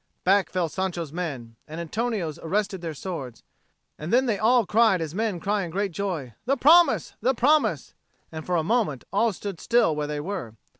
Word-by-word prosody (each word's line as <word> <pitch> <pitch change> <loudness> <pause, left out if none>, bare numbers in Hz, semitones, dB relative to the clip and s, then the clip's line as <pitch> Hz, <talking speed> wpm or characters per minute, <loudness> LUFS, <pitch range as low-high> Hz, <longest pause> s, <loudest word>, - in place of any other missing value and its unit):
Back 195 +1 +3
fell 180 -2 -1
Sancho's 170 -2 -4
men, 135 -10 -5
and 160 +2 -7
Antonio's 175 -2 -3
arrested 195 +2 -2
their 165 -3 -5
swords. 140 -8 -6 0.6
And 155 +3 -5
then 255 +2 +4
they 220 -5 0
all 235 +1 +4
cried 220 -2 +3
as 160 -2 -4
men 210 -2 -1
cry 205 +3 0
in 175 - -4
great 195 +3 -2
joy, 165 - -4
"The 275 +3 +1
promise! 335 +5 +5
the 260 +1 +2
promise!" 295 +6 +2 0.4
And 160 -1 -6
for 180 - -1
a 165 - +1
moment 195 - 0
all 225 +3 +3
stood 195 -2 -7
still 235 -9 +2
where 150 0 -2
they 150 0 -3
were. 145 - -5
185 Hz, 190 wpm, -25 LUFS, 160-220 Hz, 0.6 s, promise